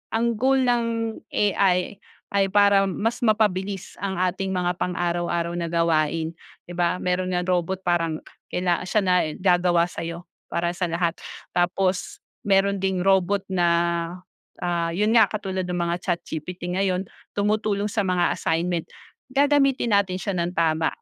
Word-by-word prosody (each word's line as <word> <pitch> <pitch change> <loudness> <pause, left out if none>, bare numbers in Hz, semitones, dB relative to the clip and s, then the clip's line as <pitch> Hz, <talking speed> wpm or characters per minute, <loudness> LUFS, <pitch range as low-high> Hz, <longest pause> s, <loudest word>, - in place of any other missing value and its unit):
ang 230 -1 0
goal 265 +1 +3
ng 230 -3 0 0.2
AI 195 -1 +1 0.3
ay 200 -1 +2
para 200 0 +4
mas 220 +5 -1
mapabilis 200 -4 0
ang 195 -1 -2
ating 190 +1 -1
mga 180 -1 -1
pang 180 -1 -1
araw-araw 175 -1 -1
na 170 -1 -3
gawain, 165 -1 +1 0.3
'di 175 - -12
ba? 175 0 +1
Meron 185 0 -1
ngang 180 - 0
robot 185 +1 -1
parang 165 -3 0 0.2
kaila 180 0 -1
siya 215 - +2
na 185 -1 +3 0.2
gagawa 175 -2 +3
sa'yo, 170 0 -5 0.2
para 170 0 -1
sa 180 0 -2
lahat. 170 0 0 0.4
Tapos 185 +1 0 0.2
meron 200 0 +3
ding 190 -2 0
robot 195 +1 +2
na, 175 -2 +2 1.0
ah 170 -1 0
'yon 210 +4 +2
nga 225 -3 +7
katulad 190 -3 -3
ng 180 - -2
mga 170 0 0
ChatGPT 175 0 -3
ngayon, 185 0 0 0.3
tumutulong 210 0 0
sa - - -1
mga 180 -1 +2
assignment, 165 +1 -1 0.4
gagamitin 275 -3 +2
natin 195 -2 +2
siya 195 +2 -3
nang 175 0 -2
tama, 160 -1 +2
185 Hz, 145 wpm, -24 LUFS, 175-200 Hz, 1.0 s, nga